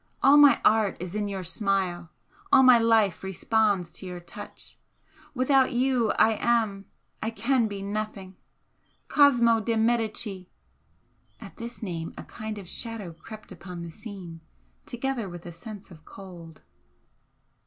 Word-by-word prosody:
All 275 Hz, +2 st, +7 dB
my 290 Hz, -1 st, +7 dB
art 215 Hz, -2 st, +3 dB
is 180 Hz, +1 st, -6 dB
in 210 Hz, -1 st, -2 dB
your 195 Hz, -2 st, -4 dB
smile 180 Hz, -1 st, -1 dB, 0.4 s
all 265 Hz, -, +7 dB
my 250 Hz, -2 st, +7 dB
life 220 Hz, -6 st, +3 dB
responds 195 Hz, -1 st, 0 dB
to 185 Hz, +3 st, -9 dB
your 180 Hz, -1 st, -6 dB
touch. 175 Hz, -, -11 dB, 0.6 s
Without 260 Hz, 0 st, +3 dB
you 250 Hz, -2 st, +1 dB
I 220 Hz, -1 st, +3 dB
am 220 Hz, -4 st, +1 dB, 0.5 s
can 235 Hz, +2 st, +2 dB
be 200 Hz, -2 st, -6 dB
nothing 200 Hz, -2 st, -5 dB, 0.7 s
Cosmo 240 Hz, -6 st, +5 dB
de 225 Hz, +2 st, -1 dB
Medicis 220 Hz, -4 st, -1 dB, 0.5 s
" -, -, -40 dB
At -, -, -12 dB
this 235 Hz, 0 st, -7 dB
name 170 Hz, -4 st, -5 dB
a -, -, -7 dB
kind 215 Hz, 0 st, -7 dB
of 195 Hz, -3 st, -9 dB
shadow 220 Hz, -4 st, -5 dB
crept 215 Hz, +6 st, -12 dB
upon 180 Hz, -2 st, -8 dB
the 170 Hz, -, -8 dB
scene, 185 Hz, -5 st, -10 dB, 0.5 s
together 240 Hz, -4 st, -3 dB
with 175 Hz, -1 st, -10 dB
a 175 Hz, -, -7 dB
sense 195 Hz, +4 st, -11 dB
of 160 Hz, -2 st, -14 dB
cold. 170 Hz, -5 st, -12 dB
210 Hz, 145 wpm, -26 LUFS, 180-230 Hz, 0.7 s, All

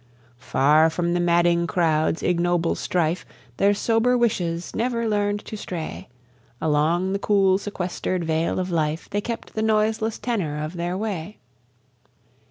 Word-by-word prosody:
Far 150 Hz, +5 st, +4 dB
from 170 Hz, +1 st, -1 dB
the 175 Hz, -, +1 dB
madding 170 Hz, 0 st, +3 dB
crowd's 165 Hz, -3 st, +1 dB
ignoble 175 Hz, -1 st, +1 dB
strife, 170 Hz, 0 st, -1 dB, 0.3 s
Their 200 Hz, +1 st, +3 dB
sober 230 Hz, +4 st, +2 dB
wishes 175 Hz, -8 st, -1 dB
never 235 Hz, 0 st, 0 dB
learn'd 205 Hz, -1 st, 0 dB
to -, -, -6 dB
stray; 175 Hz, -6 st, -6 dB, 0.5 s
Along 160 Hz, +5 st, +1 dB
the 200 Hz, -, -1 dB
cool 195 Hz, -2 st, +3 dB
sequester'd 185 Hz, -2 st, -3 dB
vale 160 Hz, 0 st, 0 dB
of 185 Hz, 0 st, -2 dB
life 155 Hz, -1 st, -1 dB
They 205 Hz, -, 0 dB
kept 230 Hz, +1 st, -6 dB
the 220 Hz, -, -2 dB
noiseless 220 Hz, 0 st, +1 dB
tenour 190 Hz, -12 st, -2 dB
of 155 Hz, +3 st, -4 dB
their 175 Hz, +1 st, -2 dB
way. 205 Hz, -2 st, -4 dB
180 Hz, 140 wpm, -23 LUFS, 165-205 Hz, 0.5 s, Far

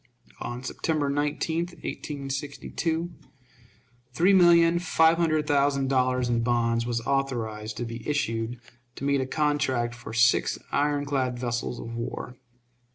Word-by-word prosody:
On 120 Hz, +1 st, -5 dB
September 145 Hz, +1 st, -1 dB
19, 150 Hz, +3 st, -1 dB, 0.3 s
1862, 145 Hz, +4 st, -3 dB, 1.0 s
three 180 Hz, +8 st, +4 dB
million 170 Hz, -2 st, +6 dB
five 165 Hz, -1 st, +3 dB
hundred 155 Hz, -3 st, +1 dB
thousand 140 Hz, -2 st, +2 dB
dollars 130 Hz, -1 st, +2 dB
in 120 Hz, -1 st, +1 dB
bonds 115 Hz, -1 st, +1 dB
was 115 Hz, -1 st, -1 dB
authorized 115 Hz, -5 st, -2 dB
to 120 Hz, -, -3 dB
be 115 Hz, +3 st, -6 dB
issued 115 Hz, -4 st, -1 dB, 0.4 s
to -, -, -8 dB
meet 140 Hz, -1 st, +2 dB
a 130 Hz, -, -2 dB
contract 135 Hz, -5 st, 0 dB
for 120 Hz, -1 st, -9 dB
six 115 Hz, +2 st, +3 dB
iron 145 Hz, 0 st, +1 dB
clad 130 Hz, -3 st, -1 dB
vessels 120 Hz, 0 st, -3 dB
of 115 Hz, -, -7 dB
war. 115 Hz, +2 st, -5 dB
135 Hz, 130 wpm, -26 LUFS, 120-150 Hz, 1.0 s, million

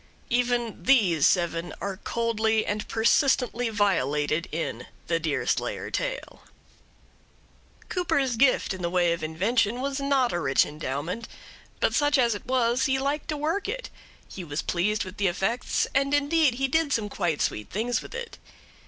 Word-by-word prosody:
Even 240 Hz, -2 st, 0 dB
these 195 Hz, -, +4 dB
seven 170 Hz, -1 st, 0 dB
are 195 Hz, -1 st, -4 dB
coldly 220 Hz, 0 st, 0 dB
and 210 Hz, 0 st, -3 dB
persistently 245 Hz, 0 st, +2 dB
violated 155 Hz, -7 st, +1 dB
in 160 Hz, +1 st, -4 dB, 0.2 s
the 165 Hz, -1 st, 0 dB
Deerslayer 155 Hz, -3 st, -2 dB
tale. -, -, -4 dB, 1.5 s
Cooper's 280 Hz, -8 st, 0 dB
gift 255 Hz, -4 st, +3 dB
in 190 Hz, -, -7 dB
the 170 Hz, -, -1 dB
way 175 Hz, -1 st, +2 dB
of 170 Hz, -, -5 dB
invention 205 Hz, +8 st, 0 dB
was 275 Hz, +1 st, -2 dB
not 275 Hz, -3 st, +1 dB
a 175 Hz, -, 0 dB
rich 135 Hz, -4 st, +3 dB
endowment; 150 Hz, -, -4 dB, 0.5 s
but -, -, +2 dB
such 290 Hz, 0 st, +3 dB
as 240 Hz, -3 st, +3 dB
it 205 Hz, -, -8 dB
was 250 Hz, -1 st, +2 dB
he 265 Hz, -2 st, +2 dB
liked 280 Hz, +3 st, -2 dB
to 305 Hz, -, -2 dB
work 330 Hz, +7 st, -1 dB
it, -, -, -5 dB, 0.4 s
he 185 Hz, -, -8 dB
was 145 Hz, -1 st, -4 dB
pleased 205 Hz, +4 st, 0 dB
with 185 Hz, +2 st, -10 dB
the 200 Hz, -, +2 dB
effects, 195 Hz, +7 st, 0 dB
and 275 Hz, +1 st, +2 dB
indeed 290 Hz, -2 st, +2 dB
he 270 Hz, +2 st, 0 dB
did 320 Hz, +2 st, +1 dB
some 220 Hz, -5 st, 0 dB
quite 175 Hz, -7 st, -1 dB
sweet 105 Hz, -, -2 dB
things 235 Hz, +5 st, -1 dB
with -, -, -10 dB
it. 475 Hz, 0 st, -7 dB
230 Hz, 160 wpm, -26 LUFS, 175-270 Hz, 1.5 s, these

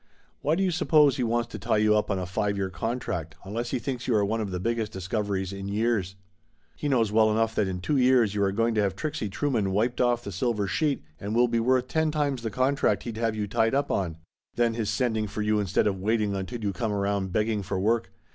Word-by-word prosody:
Why 150 Hz, +3 st, +2 dB
do 195 Hz, -, +1 dB
you 185 Hz, -, +2 dB
suppose 155 Hz, -5 st, +4 dB
he 130 Hz, -, 0 dB
wants 120 Hz, 0 st, 0 dB
to 110 Hz, -, -7 dB
tie 110 Hz, +2 st, +1 dB
you 105 Hz, 0 st, +4 dB
up 105 Hz, -, +1 dB
on 100 Hz, -, 0 dB
a 90 Hz, -, -3 dB
five 100 Hz, +3 st, -1 dB
year 95 Hz, -1 st, -2 dB
contract, 90 Hz, -6 st, -3 dB
unless 115 Hz, +5 st, -3 dB
he 130 Hz, -, 0 dB
thinks 125 Hz, +1 st, -4 dB
you 120 Hz, -, +2 dB
are 105 Hz, -1 st, +3 dB
one 110 Hz, +2 st, -1 dB
of 105 Hz, -, -3 dB
the 90 Hz, -1 st, -3 dB
biggest 115 Hz, +2 st, -1 dB
discoveries 95 Hz, 0 st, -2 dB
in 100 Hz, 0 st, -6 dB
years? 100 Hz, -2 st, 0 dB, 0.6 s
He 145 Hz, -, -3 dB
knows 115 Hz, -6 st, +2 dB
well 110 Hz, 0 st, +4 dB
enough 110 Hz, +1 st, +1 dB
that 105 Hz, -, +1 dB
in 90 Hz, -1 st, -4 dB
two 145 Hz, +9 st, 0 dB
years 125 Hz, -5 st, +4 dB
you 105 Hz, -, -1 dB
are 100 Hz, -1 st, +2 dB
go 115 Hz, +4 st, +1 dB
ing 115 Hz, -, +1 dB
to 110 Hz, -, +2 dB
have 100 Hz, -2 st, 0 dB
Trixie 150 Hz, -3 st, -3 dB
Trueman 115 Hz, -1 st, 0 dB
wiped 110 Hz, +6 st, 0 dB
off 120 Hz, -1 st, +2 dB
the 100 Hz, -, -6 dB
silver 105 Hz, +2 st, 0 dB
sheet 150 Hz, +6 st, 0 dB, 0.2 s
and 105 Hz, +2 st, -3 dB
will 120 Hz, +1 st, +5 dB
be 115 Hz, -1 st, 0 dB
worth 125 Hz, +2 st, +2 dB
ten 160 Hz, +2 st, +1 dB
times 145 Hz, -4 st, -1 dB
the 115 Hz, -, -2 dB
contract 130 Hz, +5 st, +1 dB
he'd 115 Hz, -2 st, -5 dB
have 115 Hz, -1 st, 0 dB
you 105 Hz, -1 st, -1 dB
tied 115 Hz, +4 st, +1 dB
up 140 Hz, +1 st, 0 dB
on! 85 Hz, -5 st, -1 dB, 0.4 s
Then 120 Hz, -1 st, +2 dB
his 110 Hz, -2 st, -2 dB
sending 110 Hz, 0 st, 0 dB
for 105 Hz, +1 st, -3 dB
you 105 Hz, 0 st, +2 dB
instead 100 Hz, -2 st, +1 dB
of 100 Hz, -2 st, 0 dB
wait 110 Hz, +4 st, +1 dB
ing 105 Hz, -1 st, 0 dB
until 105 Hz, +5 st, -5 dB
you 100 Hz, -1 st, -1 dB
come 110 Hz, +3 st, -2 dB
around 100 Hz, -1 st, -1 dB
begging 105 Hz, +1 st, 0 dB
for 95 Hz, 0 st, -3 dB
work! 110 Hz, 0 st, +1 dB
110 Hz, 255 wpm, -27 LUFS, 100-120 Hz, 0.6 s, will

